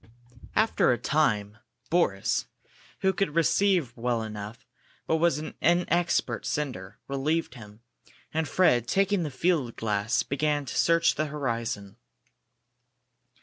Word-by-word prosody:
After 220 -10 +3
a 120 - +1
time 110 -6 0 0.3
Boris, 130 - +1 0.5
who 190 0 +3
could 175 -4 -1
receive 170 -5 +2
well 120 -1 -1
enough 105 0 -8 0.4
but 160 - +1
was 170 -2 +2
an 155 - -6
inexpert 175 +1 +1
sender, 110 -9 -4
relieved 140 +1 -1
him, 105 -3 -13 0.5
and 160 0 0
Fred, 120 -10 +3
taking 195 +2 +2
the 155 - -2
field 145 -4 0
glass, 110 +2 0
began 145 +2 -1
to - - -6
search 165 0 +3
the 155 - -1
horizon. 115 -8 -3
140 Hz, 120 wpm, -27 LUFS, 115-165 Hz, 0.5 s, After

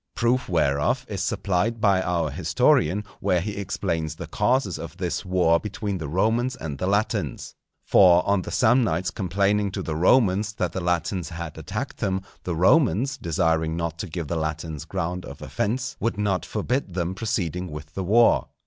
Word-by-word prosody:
Proof 125 0 +1
whereof 80 - +1
is 100 - -4
supplied 105 +5 0
by 100 -3 +3
our 85 -4 -1
historian 90 +3 +2 0.2
where 90 - +2
he 100 +4 -4
explains 85 -5 -2
the - - -7
causes 125 -8 0
of - - -8
this - - -2
war 90 -3 +3
between 105 -2 -4
the 80 - -4
Romans 110 - +1
and 75 - -6
the 90 - -1
Latins. 100 +2 -1 0.3
For 90 -2 +5
on 100 -1 +2
the - - -7
Samnites 110 -8 +2
complaining 100 +2 +1
to 95 - -3
the 80 -3 -3
Romans 100 +3 +3
that 90 -5 -2
the 95 - -4
Latins 90 0 -1
had 85 -2 -6
attacked 105 - -5
them, 95 -3 -1 0.2
the 90 - -2
Romans, 125 - +3
desiring 80 - 0
not 85 -1 -3
to 100 - -4
give 85 0 -4
the 85 - -2
Latins 80 -1 -4
ground 90 +1 -3
of - - -9
offence, 125 +5 -2
would 115 -3 -1
not 100 -4 0
forbid 125 -7 -2
them 90 0 -1
proceeding 95 -4 -2
with 75 0 -9
the 95 - -3
war. 115 +6 +4
95 Hz, 175 wpm, -24 LUFS, 85-105 Hz, 0.3 s, For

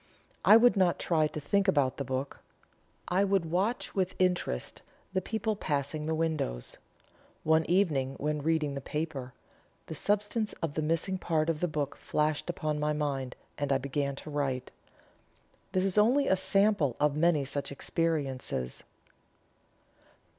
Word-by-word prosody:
I 215 - +9
would 240 0 +5
not 185 -3 +3
try 155 -3 +2
to 155 - -6
think 200 +7 +1
about 145 -8 +2
the 140 - -2
book. 130 +1 -4 0.7
I 185 +3 +2
would 195 -5 +1
watch 200 +8 0
with 185 -2 0
interest 180 - -1 0.3
the 185 - +1
people 220 +2 -2
passing 150 -3 -2
the 160 - 0
windows. 155 - -2 0.7
One 160 0 +3
evening 150 -8 +2
when 150 0 -1
reading 155 -1 +1
the 140 - -4
paper, 140 -4 -4 0.5
the - - -6
substance 205 +5 0
of 160 -3 -4
the 155 - -1
missing 165 +4 0
part 160 -2 +1
of 155 - -5
the 180 - +1
book 150 -3 -2
flashed 150 0 -1
upon 150 -1 -2
my 150 0 +1
mind, 140 -4 -2 0.2
and 145 -1 -1
I 135 - +4
began 140 +1 -2
to 150 - -9
write. 135 -3 -2 1.0
This 185 0 +1
is 195 +1 +2
only 255 +7 +4
a 190 - +4
sample 195 - +2
of 150 -1 +2
many 155 -2 +3
such 140 +1 -3
experiences." 140 - -2
155 Hz, 155 wpm, -30 LUFS, 140-185 Hz, 1.0 s, I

